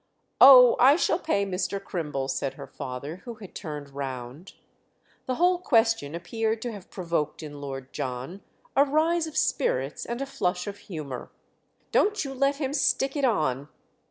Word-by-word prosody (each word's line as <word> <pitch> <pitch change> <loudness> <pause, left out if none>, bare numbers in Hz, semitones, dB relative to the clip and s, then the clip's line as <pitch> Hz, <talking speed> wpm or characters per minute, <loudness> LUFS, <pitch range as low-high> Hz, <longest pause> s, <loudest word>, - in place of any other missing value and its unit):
"Oh, 250 -3 +10
I 270 +4 +7
shall 330 0 +1
pay 200 - 0
Mr. 185 0 -2
Crimble!" 150 -8 -4
said 135 0 -2
her 140 - -8
father, 135 +4 -7
who 235 +4 -9
had 205 -4 -12
turned 150 -3 -7
round. 135 +3 -7 0.7
The 255 - 0
whole 355 +3 +3
question 225 - +2
appeared 220 +6 -2
to 240 - -3
have 200 -4 -10
provoked 170 -4 -3
in 145 -2 -8
Lord 135 -2 -7
John 135 +6 -5 0.3
a 280 - +6
rise 320 +3 +1
of 310 0 -7
spirits 135 - 0
and 235 +1 -3
a 275 - -2
flush 180 -9 -2
of 205 -1 -6
humour. 145 -8 -6 0.6
"Don't 420 -5 +2
you 270 - -5
let 275 +1 +1
him 275 -1 -3
stick 270 -1 +1
it 285 -2 +1
on." 150 - 0
195 Hz, 165 wpm, -26 LUFS, -, 0.7 s, Oh